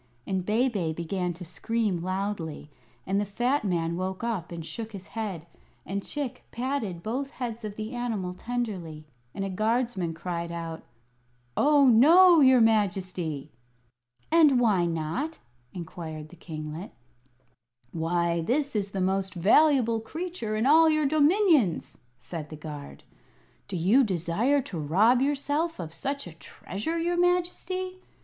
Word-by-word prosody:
And 190 -1 -1
Bebe 210 -5 0
began 175 +2 -2
to 175 +2 -9
scream 195 +2 -1
loudly; 185 -5 -4 0.3
and 195 +2 +1
the - - +1
fat 240 +8 0
man 170 -4 0
woke 185 +3 -3
up 215 -8 -2
and 165 -2 -6
shook 225 +4 -7
his 190 -2 -8
head, 200 -8 -4 0.4
and 200 +2 -3
Chick 285 +3 -4
patted 235 -9 -3
both 265 +5 -2
heads 240 -4 -5
of 210 -1 -5
the 215 +3 -5
animal 225 -7 -2
tenderly, 185 -9 -4 0.3
and 195 - -2
a - - -3
guardsman 215 -4 0
cried 170 0 -4
out: 165 -1 -5 0.7
"Oh, 290 -1 +5
no, 330 +9 +7
your 260 -3 +6
Majesty!" 185 -9 0 0.8
"And 305 -6 +6
why 200 -8 +3
not?" 165 - -3 0.3
inquired 160 -3 -7
the 180 - -14
kinglet. 160 +2 -7 1.0
"Why, 170 +1 0
this 275 - 0
is 200 -2 0
the 195 -1 -3
most 190 +1 0
valuable 230 - +4
creature 310 -3 -4
in 220 +2 0
all 320 +3 +6
your 310 -1 +2
dominions!" 305 - +3 0.2
said 160 0 -7
the 155 - -7
guard. 150 -2 -9 0.6
"Do 200 - -5
you 205 +11 +4
desire 210 - +1
to 175 -8 -6
rob 205 - +3
yourself 290 +4 0
of 160 -2 -6
such 280 - -3
a 175 - -9
treasure, 205 - -5
your 345 +1 0
Majesty?" 360 +1 0
205 Hz, 140 wpm, -27 LUFS, 170-265 Hz, 1.0 s, no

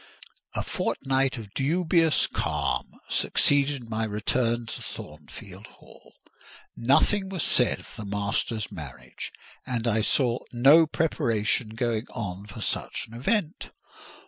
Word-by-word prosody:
A - - 0
fortnight 135 -1 0
of 105 -3 -9
dubious 165 +2 +3
calm - - -2
succeeded 140 -3 +2
my 110 0 -2
return 115 +2 0
to 115 - -6
Thornfield 90 +6 -10
Hall. - - -19 0.6
Nothing 190 - +3
was 185 -5 -2
said 125 - +3
of - - -15
the 110 - -7
master's 100 +2 -2
marriage, 75 -6 -8 0.3
and 120 -2 -2
I 110 -1 +2
saw 120 +2 +2
no 140 +7 +7
preparation 115 -8 +1
going 115 0 -1
on 100 -4 -5
for 105 +2 -9
such - - -2
an 110 - -16
event. 165 - -1
120 Hz, 120 wpm, -27 LUFS, 105-140 Hz, 0.6 s, no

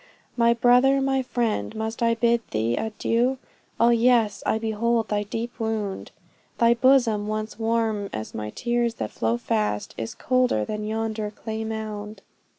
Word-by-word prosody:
My 235 -1 +4
brother, 250 +3 +4
my 270 0 +1
friend, 230 - -2
must 220 +1 -4
I 230 0 +3
bid 235 0 +2
thee 110 +2 0
adieu! 230 - 0 0.4
Ah 235 +1 +5
yes, 235 -3 +3
I - - +2
behold 225 +1 0
thy 210 -1 0
deep 230 +4 -5
wound 220 -3 -3 0.5
Thy 235 0 +5
bosom, 235 -4 +3
once 215 +1 -4
warm 225 -3 0
as 110 0 -6
my 105 0 -4
tears 240 - -1
that 110 - -4
fast 110 -2 -1
flow, - - -5
Is 115 - -7
colder 250 - +1
than 210 0 -4
yonder 220 -1 -2
clay 220 +1 -5
mound. 215 -2 -6
220 Hz, 155 wpm, -24 LUFS, 210-235 Hz, 0.5 s, Ah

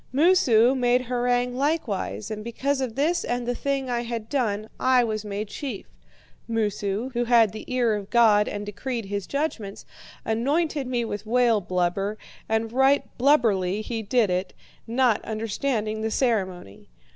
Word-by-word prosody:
Moosu 265 -6 +4
made 250 -1 +2
harangue 245 0 0
likewise, 250 - -2
and 215 0 -5
because 270 +4 -1
of 245 -4 -3
this 325 +5 +1
and 245 0 -2
the 245 - 0
thing 275 +1 -2
I 240 -1 -1
had 230 -2 -5
done 215 -6 -1
I 255 -1 +4
was 215 -2 -2
made 210 0 -4
chief. 235 0 -6 0.6
Moosu, 210 0 -1
who 240 0 0
had 230 -3 +5
the 215 - -9
ear 245 -3 +2
of 205 -2 -4
God 215 -3 +5
and 205 0 -4
decreed 230 +3 -4
his 200 -1 -4
judgments, 280 -9 -3 0.4
anointed 280 +5 0
me 245 -2 -1
with 210 -1 -5
whale 235 -2 +3
blubber, 185 +3 -1 0.3
and 220 +1 0
right 270 +2 +2
blubberly 215 -8 +2
he 225 0 -3
did 220 -1 +1
it, 180 +1 -2 0.3
not 240 -1 +2
understanding 220 0 -2
the 220 - -1
ceremony. 190 - -2
230 Hz, 155 wpm, -25 LUFS, 210-255 Hz, 0.6 s, had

